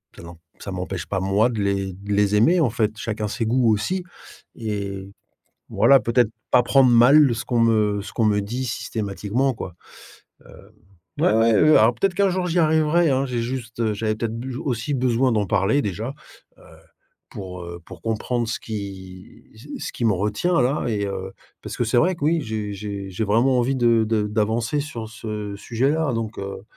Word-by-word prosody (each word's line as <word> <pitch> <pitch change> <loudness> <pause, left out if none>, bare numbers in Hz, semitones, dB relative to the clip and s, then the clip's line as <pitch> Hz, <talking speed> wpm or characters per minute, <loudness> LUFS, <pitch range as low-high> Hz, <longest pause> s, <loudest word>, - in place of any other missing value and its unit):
ça - - -12
n'em 85 0 -11 0.2
ça 100 - -7
m'empêche 90 -1 -4
pas 95 - -2
moi 100 +5 +2
de 115 - -4
les 100 -1 -1
de 100 +3 -9
les 105 0 +2
aimer, 160 +13 +4
en 140 -9 +2
fait, 110 -2 -1
chacun 110 -2 -3
ses 115 +2 -3
goûts 120 0 +2
aussi 180 - -2 0.5
et 100 -3 -5 0.6
voilà, 135 -1 +5
peut-être 115 0 +2 0.2
pas 125 - +5
prendre 135 0 +4
mal 125 +3 +6
ce 120 +2 -5
qu'on 120 -1 0
me 105 -3 +2
ce 105 - -9
qu'on 115 - +1
me 105 -1 +2
dit 120 +6 -4
systématiquement, 110 +3 -2
quoi. 90 -5 -7 0.7
Hem, - - -16 0.5
ouais - - +4
ouais, 115 0 +4
heu, 155 +8 +6
alors 115 +3 +4
peut-être 190 - 0
qu'un 200 +1 +3
jour 185 0 -1
j'y 175 +1 0
arriverai 160 +1 +3
hein, 135 0 +1
j'ai 125 -2 -2
juste, 120 -1 -5
heu, 110 -2 +1
j'avais 110 +1 -1
peut-être 115 0 -3
buj 125 +1 -6
aussi 125 0 -3
besoin 125 0 +1
d'en 105 -2 +1
parler 100 +9 +2
déjà, 110 +5 -4 0.5
heu, - - -19 0.7
pour, 90 -2 -8
heu, 85 0 -8
pour 90 -4 -12
comprendre 115 +2 -1
ce 115 - -3
qui 95 -4 -8
ce - - -14 0.2
ce - - -5
qui - - -4
me 110 - +4
retient 105 - 0
là 135 +4 0
et 105 -3 -1
heu, 95 -1 -5 0.3
parce - - -7
que 120 - +1
c'est 115 +2 0
vrai 180 +6 +2
que 145 - -5
oui, 165 +2 +2
j'ai 110 -4 -4
j'ai 100 -1 -6
j'ai 100 +4 -2
vraiment 120 +5 +2
envie 130 +3 +1
de 115 -3 +3
de 110 -1 +1
d'avancer 110 +6 0
sur 120 -7 -6
ce 105 -3 -6
sujet-là 135 +7 0
donc, 115 -1 -4
heu 100 0 -6
115 Hz, 195 wpm, -22 LUFS, 100-130 Hz, 0.7 s, mal